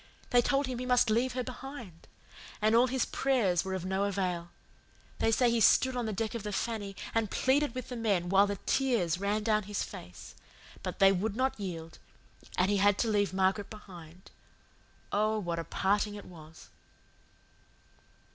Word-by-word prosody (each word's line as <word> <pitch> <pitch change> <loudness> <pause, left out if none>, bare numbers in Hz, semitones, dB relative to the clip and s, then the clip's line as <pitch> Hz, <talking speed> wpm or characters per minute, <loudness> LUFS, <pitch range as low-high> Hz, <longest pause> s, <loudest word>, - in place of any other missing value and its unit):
They 245 -1 +6
told 275 +3 +1
him 255 -2 -4
he 250 - -4
must 245 -3 +3
leave 245 +3 +1
her 255 0 -2
behind. 245 - -9 0.5
And 215 +1 +2
all 240 +2 +5
his 260 0 0
prayers 225 -11 +1
were 190 0 -3
of 185 -1 -5
no 190 +1 0
avail. 180 -4 -2 0.7
They - - +2
say 240 +2 +3
he 235 - +2
stood 260 +3 +5
on 245 -2 -2
the - - -1
deck 220 +3 -2
of 235 - -4
the 210 0 -5
Fanny 205 -1 -3 0.2
and 225 -2 +1
pleaded 275 +3 +1
with 255 0 -5
the 250 - -5
men 205 -7 0
while 195 +2 +4
the 200 - -2
tears 220 -11 +1
ran 205 +2 0
down 215 -1 +2
his 205 - -1
face; 90 0 -10 0.5
but - - -5
they 195 0 +6
would 195 +2 -1
not 260 -1 0
yield, 165 -4 -6 0.6
and 185 +2 +3
he 205 - +2
had 205 0 +4
to 230 - 0
leave 205 -2 +1
Margaret 190 +2 +1
behind. 180 -5 -13 0.8
Oh, 215 +1 +1
what 175 -5 -2
a - - -3
parting 205 +4 0
it 205 - -9
was!" 160 -2 -14
210 Hz, 185 wpm, -30 LUFS, 190-240 Hz, 0.8 s, They